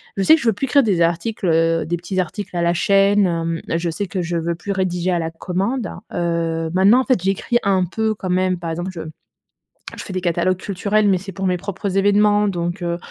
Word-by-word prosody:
Je 195 - -1
sais 255 +12 +6
que 320 - -3
je - - -6
veux 225 - +4
plus 270 - -2
écrire 275 +2 +4
des 195 -7 +1
articles, 175 +5 0
heu, 165 0 +2
des 175 - -1
petits 175 +2 -4
articles 185 +1 -4
à 175 - 0
la 170 0 +2
chaîne, 200 +2 +3
hem. 165 -1 -2 0.2
Je 170 0 -2
sais 165 +5 -3
que 185 0 -3
je 170 0 -2
veux 170 +1 -1
plus 200 +4 -4
rédiger 185 -1 -1
à 175 - +1
la 165 -1 -3
commande. 195 +7 -2 0.2
Heu, 165 -1 -1
maintenant, 195 +7 +5
en - - -4
fait, 255 -5 +2
j'écris 195 +5 +1
un 195 -2 +2
peu, 220 +5 -1
quand 195 -3 -6
même. 185 0 +1
Par 170 - -5
exemple, 175 +3 -4
je 170 - -6 1.0
je - - -6
fais - - -8
des 185 - -2
catalogues 175 +1 0
culturels, 205 +2 0
mais 195 -2 +3
c'est 195 +2 -8
pour 190 +2 -4
mes 180 - +1
propres 195 +1 -4
événements 205 +1 +3
donc 175 0 -3
heu 170 0 -2
185 Hz, 240 wpm, -20 LUFS, 170-200 Hz, 1.0 s, sais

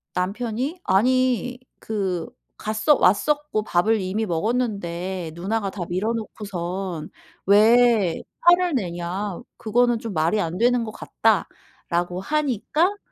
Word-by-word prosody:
"남편이 240 - -2
아니 250 +4 +2 0.2
그 190 -6 -2 0.3
갔어 215 +8 +2
왔었고 250 +4 +2
밥을 215 +2 +2
이미 195 +4 -1
먹었는데 185 -4 -2
누나가 200 +3 -2
다 190 - -5
미뤄 190 +6 0
놓고선 190 -6 -5 0.4
왜 215 -2 +5 0.2
화를 350 -1 +5
내냐 180 -1 -3 0.2
그거는 240 +1 +2
좀 225 -3 -6
말이 165 +6 +1
안 170 +2 -3
되는 245 +1 +3
것 215 - -5
같다."라고 180 -5 -2
하니까 300 - 0
215 Hz, 230 characters per minute, -23 LUFS, 180-245 Hz, 0.4 s, 왜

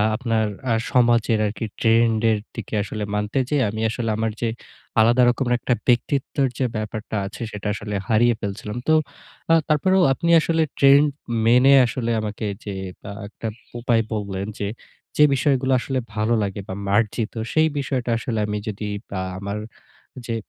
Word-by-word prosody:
আপনার 115 -2 0 0.3
আ - - +4 0.2
সমাজের 120 -2 +3
আরকি 105 +2 -3
trend 115 0 +3
এর 110 - +2 0.2
দিকে 115 -1 -7
আসলে 105 +1 -5
মানতে 105 +5 -2
যেয়ে 145 -3 +2
আমি 110 +1 -4
আসলে 115 +1 -3
আমার 110 0 0
যে 120 - +1 0.5
আলাদা 120 +3 +5
রকম 125 +1 0
একটা 125 - 0
ব্যক্তিত্বের 135 +3 +1
যে 130 - +1
ব্যাপারটা 110 0 -4
আছে 100 +5 -8
সেটা 105 0 -6
আসলে 105 0 -6 0.2
হারিয়ে 115 +1 +4
ফেলছিলাম। 105 +2 -5
তো 155 - +5 0.6
আ - - +7 0.2
তারপরেও 185 +6 +3
আপনি 170 +5 -2
আসলে 165 +1 +1 0.2
trend 140 +2 +6 0.4
মেনে 125 +4 +6
আসলে 120 0 -2
আমাকে 105 0 -4 0.2
যে 100 - -5 0.4
আ - - -5 0.2
একটা 110 +2 -7 0.3
উপায় 120 -1 +2
বললেন 100 -2 -3
যে, 100 - -1 0.5
যে 150 - +7
বিষয়গুলো 135 -1 +1
আসলে 130 +1 -2 0.2
ভালো 110 +2 +1
লাগে 100 0 -4
বা 95 - -5
মার্জিত 105 +2 0 0.2
সেই 160 0 +4
বিষয়টা 130 -3 -2
আসলে 115 -1 -3
আমি 105 0 -2
যদি 105 0 -4 0.3
আ - - -1 0.2
আমার 100 +1 -4 0.7
যে 115 - -1
115 Hz, 160 wpm, -22 LUFS, 105-130 Hz, 0.7 s, আ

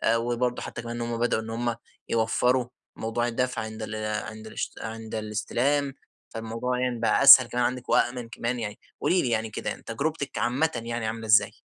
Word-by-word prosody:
وبرضه 120 +1 -1
حتى - - -6
كمان 120 0 -5
هم 120 0 -2
بدأوا 120 -2 +1
إن 110 - -8
هم 120 +1 -1 0.3
يوفروا 120 +2 +2 0.3
موضوع 115 +2 -1
الدفع 125 +2 -1
عند 110 0 -6
ال 110 0 -5 0.3
عند 110 0 -9
الش - - -4
عند 110 0 -6
الاستلام، 120 +7 0 0.4
فالموضوع 115 +2 -3
يعني 125 -2 -1
بقى 115 - +2
أسهل 130 -2 +11
كمان 125 +1 -1
عندِك 125 0 -2
وآمن 120 -1 +1
كمان 120 +2 -3
يعني، 105 -2 -5 0.2
قولي 180 - +3
لي 125 - -1
يعني 110 -1 0
كده 110 - -4
تجربتِك 140 +4 -3
عامةً 140 +6 +1
يعني 115 -1 -3
عاملة 110 +1 -4
إزاي؟ 110 0 +5
120 Hz, 175 wpm, -26 LUFS, 110-125 Hz, 0.4 s, أسهل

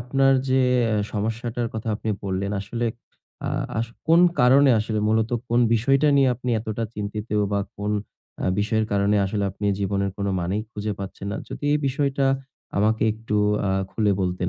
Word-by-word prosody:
আপনার 135 +2 +3 0.2
যে 130 0 +4 0.5
সমস্যাটার 115 +2 -2
কথা 110 0 -4
আপনি 110 - -3
বললেন। 100 +1 -2
আসলে 115 +4 -3 0.6
আ - - 0 0.3
আস 115 - 0 0.2
কোন 165 +1 +6 0.2
কারণে 135 +3 +6
আসলে 110 0 -1
মূলত 110 +1 +2 0.2
কোন 120 +1 +3
বিষয়টা 135 +6 +3
নিয়ে 135 -2 +5
আপনি 125 +1 -4
এতটা 110 +1 -3
চিন্তিত? 105 +1 -4 0.3
বা 100 - +2 0.2
কোন 105 +1 -2 0.5
অ্যা - - -1
বিষয়ের 110 +1 +1
কারণে 100 +1 +2
আসলে 100 +1 -1
আপনি 105 +2 -4
জীবনের 100 0 0
কোন 100 - -2
মানেই 95 +5 -1
খুঁজে 105 -2 -3
পাচ্ছেন 100 0 -7
না, - - -3
যদি - - -7
এই 150 - +3
বিষয়টা 140 0 +1 0.5
আমাকে 110 +2 +2
একটু 110 -1 -3 0.3
আ - - +1 0.2
খুলে 105 -2 +1
বলতেন 90 -1 -1
110 Hz, 165 wpm, -24 LUFS, 100-120 Hz, 0.6 s, কোন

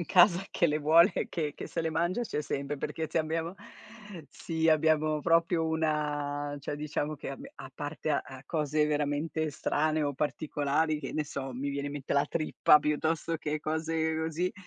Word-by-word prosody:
in 175 - -2
casa 180 0 +6
che 170 - +2
le 150 0 +1
vuole 165 +6 +6
e - - -1
che 150 -3 -2
che - - -7
se - - -2
le 160 - -1
mangia 175 +9 0
c'è 180 - -2
sempre 140 +1 -3
perché 160 +3 -3
ci 160 - -1
abbiamo 165 +3 -2 0.7
sì 160 -1 -2
abbiamo 155 -1 +3
proprio 165 +1 +3
una 150 -2 -1
cioè 140 +1 -4
diciamo 150 0 -2
che 140 - -7
abbi 135 - -8
a 130 - -10
parte 150 +2 -4
a 135 -2 -2
cose 150 0 +1
veramente 150 +2 -1
strane 155 +2 0
o 145 -1 0
particolari, 150 +1 0
che 135 - -6
ne 155 - -1
so, 135 -2 -5
mi 135 +3 -3
viene 140 0 -3
in 145 - -4
mente 145 -2 -4
la 140 +1 +3
trippa 155 -1 +4
piuttosto 160 +2 0
che 150 -1 -3
cose 160 +1 -1
così, 160 +3 -1
155 Hz, 185 wpm, -30 LUFS, 145-160 Hz, 0.7 s, casa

